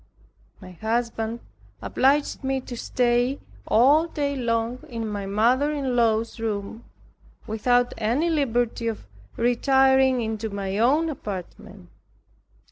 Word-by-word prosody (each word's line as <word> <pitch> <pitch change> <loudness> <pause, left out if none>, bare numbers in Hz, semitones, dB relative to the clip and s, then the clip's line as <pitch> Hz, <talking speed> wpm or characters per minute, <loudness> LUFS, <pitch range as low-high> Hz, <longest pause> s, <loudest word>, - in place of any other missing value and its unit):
My 185 -2 -11
husband 225 +3 -2 0.4
obliged 280 +2 +1
me 265 0 0
to 250 - -8
stay 245 +3 0 0.3
all 285 +8 +4
day 285 -3 -2
long 235 -1 -1
in 230 -2 -4
my 205 -2 -4
mother 240 +8 +2
in 275 -4 -2
law's 230 -1 +1
room, 220 0 -4 0.6
without 245 +3 +1
any 240 +10 +1
liberty 245 -6 0
of 225 - -4 0.3
retiring 265 +2 +3
into 220 0 -3
my 200 0 -3
own 290 +8 +3
apartment. 205 - -7
240 Hz, 115 wpm, -24 LUFS, 220-265 Hz, 0.6 s, all